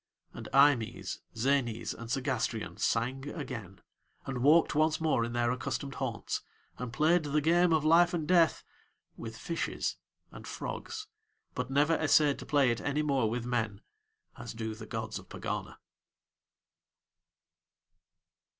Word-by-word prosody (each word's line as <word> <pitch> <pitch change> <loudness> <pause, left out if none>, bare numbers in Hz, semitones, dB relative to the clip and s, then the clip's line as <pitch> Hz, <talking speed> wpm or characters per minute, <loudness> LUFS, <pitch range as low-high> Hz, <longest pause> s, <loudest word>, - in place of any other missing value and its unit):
And - - -8
Eimës, 135 -5 +3 0.2
Zänës, 120 -1 0
and 115 - -9
Segástrion 120 -3 -2
sang 130 +5 0
again, 115 - -7 0.4
and 130 -2 -3
walked 155 +5 +5
once 155 +1 +2
more 155 -7 +2
in 120 0 -3
their 120 0 +1
accustomed 135 +2 -3
haunts, 120 -5 -2 0.4
and 125 -1 -4
played 160 +7 +3
the 145 +1 +1
game 170 +3 +3
of 155 -2 +2
Life 170 +2 +6
and 165 -4 -2
Death 170 -3 +4 0.5
with 115 -1 -8
fishes 165 +7 -2 0.3
and - - -10
frogs, 440 -2 -5 0.5
but - - -3
never 145 +4 +3
essayed 150 -2 +3
to - - -9
play 140 -3 +4
it 120 - -2
any 145 +1 0
more 135 -6 +1
with 120 +1 -3
men, 110 -4 -1 0.6
as 120 -2 -7
do 110 -1 -3
the 110 0 -10
gods 110 -2 -4
of - - -16
Pegana. - - -5
135 Hz, 140 wpm, -31 LUFS, 115-155 Hz, 0.6 s, Life